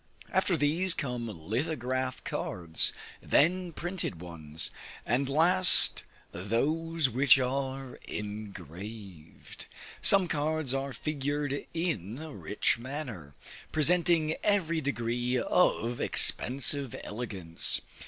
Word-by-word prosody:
After 190 -2 +2
these, 165 +5 +2
come 125 -5 -3
lithographic 125 - -3
cards, 85 -2 -1 0.3
then 180 +3 +2
printed 175 - -3
ones, 80 -3 -6 0.3
and 130 +4 0
last 175 +5 +6 0.3
those 150 - 0
which 130 +2 +5
are 135 0 -3
engraved. 100 -3 -8 0.3
Some 195 -2 +6
cards 155 -3 -1
are 135 0 -2
figured 145 +1 -3
in 125 - -2
a 155 0 -8
rich 105 +2 0
manner, 120 - -7 0.4
presenting 160 0 +2
every 170 -6 +1
degree 120 -2 -1
of 120 -4 +1
expensive 135 +1 +1
elegance. 100 -7 -1
135 Hz, 95 wpm, -29 LUFS, 110-160 Hz, 0.4 s, last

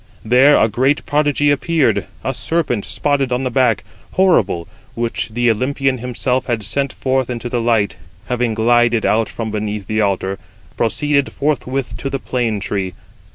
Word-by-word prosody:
103 110 - -11
There 140 +3 +7
a - - +4
great 130 +7 +1
prodigy 145 0 +2
appeared; 155 +1 +1 0.2
a - - -1
serpent, 150 -11 -1
spotted 140 -3 0
on 125 +2 0
the 130 - -1
back, 125 -5 +2 0.3
horrible, 180 - +2 0.3
which 115 -1 -2
the 120 +1 +2
Olympian 130 +3 0
himself 125 +1 -1
had 115 -4 -1
sent 140 +7 -1
forth 130 -1 -1
into 120 0 -4
the 120 -1 -1
light, 115 -5 +1 0.3
having 120 -2 -1
glided 120 0 +3
out 115 +1 +2
from 110 -2 -4
beneath 105 -1 -3
the 110 +2 0
altar, 95 -1 -1 0.4
proceeded 140 +4 +1
forthwith 135 -3 -2
to 135 - -4
the 135 - -2
plane 120 -5 -1
tree. 95 -2 -3
125 Hz, 160 wpm, -18 LUFS, 110-135 Hz, 0.4 s, There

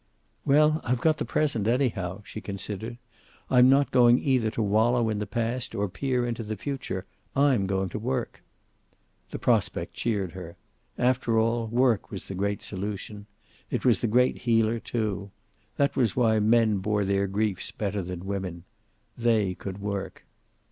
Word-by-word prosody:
"Well, 150 +2 +4
I've 125 0 0
got 155 +3 +2
the - - -1
present, 120 -9 0
anyhow," 110 -6 0
she 110 - -8
considered. 105 +4 -5 0.5
"I'm 125 0 +7
not 140 +1 +4
going 120 -1 +6
either 130 -5 +1
to 110 0 -2
wallow 110 +3 +2
in 105 -1 -1
the 105 - -3
past 115 +3 -2
or 100 0 0
peer 125 +3 -1
into 120 -1 -3
the 110 -1 -4
future. 130 -9 -4 0.3
I'm 135 -8 +3
going 95 -1 -1
to 105 - -5
work." 125 +1 -3 0.9
The - - -5
prospect - - 0
cheered 100 -6 -1
her. 90 -2 -9 0.4
After 125 -2 +2
all, 115 +1 +1
work 120 -1 +2
was 95 - -7
the - - -5
great 100 +1 -2
solution. 100 +1 -5 0.4
It - - -2
was 120 -6 +4
the 120 - 0
great 125 +3 +2
healer, 115 -1 +2
too. 105 -4 -3 0.5
That 140 0 +2
was 120 -7 +1
why 110 -3 +3
men 110 -1 +3
bore 105 +1 0
their 100 0 +1
griefs 100 -1 -1
better 100 -1 -3
than 90 0 -6
women. 95 -4 -4 0.5
They 110 -5 +2
could 95 +1 -7
work. 100 -1 -4
110 Hz, 160 wpm, -27 LUFS, 100-125 Hz, 0.9 s, I'm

